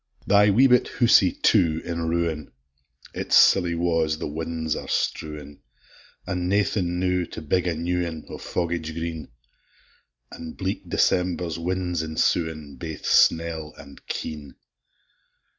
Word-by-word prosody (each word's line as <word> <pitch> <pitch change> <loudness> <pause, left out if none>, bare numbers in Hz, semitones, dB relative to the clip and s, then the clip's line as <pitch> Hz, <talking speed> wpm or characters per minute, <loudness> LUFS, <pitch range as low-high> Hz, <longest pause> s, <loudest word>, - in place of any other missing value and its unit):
Thy 105 +1 +5
wee 115 +7 +5
bit 125 -2 +4
housie, 115 -6 +5
too, 85 -7 +2
in 85 -1 -3
ruin; 85 -3 -2 0.6
Its - - 0
silly 90 -3 +5
wa's 80 -2 0
the 85 - -5
win's 80 +1 -3
are - - -6
strewin'! 75 -2 -3 0.7
An' 90 -2 -2
naething, 95 -2 0
now, 90 0 +1
to - - -7
big 90 +4 0
a 85 - 0
new 90 +2 -1
ane, 80 -3 -6
O' - - -8
foggage 85 -2 -3
green! 85 -2 -5 1.0
An' 80 -1 -8
bleak - - -4
December's 90 -2 0
winds 90 -1 -2
ensuin', 80 -2 -1
Baith 80 -2 -7
snell 80 -2 +2
and 70 - -14
keen! 75 -2 -6
85 Hz, 130 wpm, -24 LUFS, 80-90 Hz, 1.0 s, Thy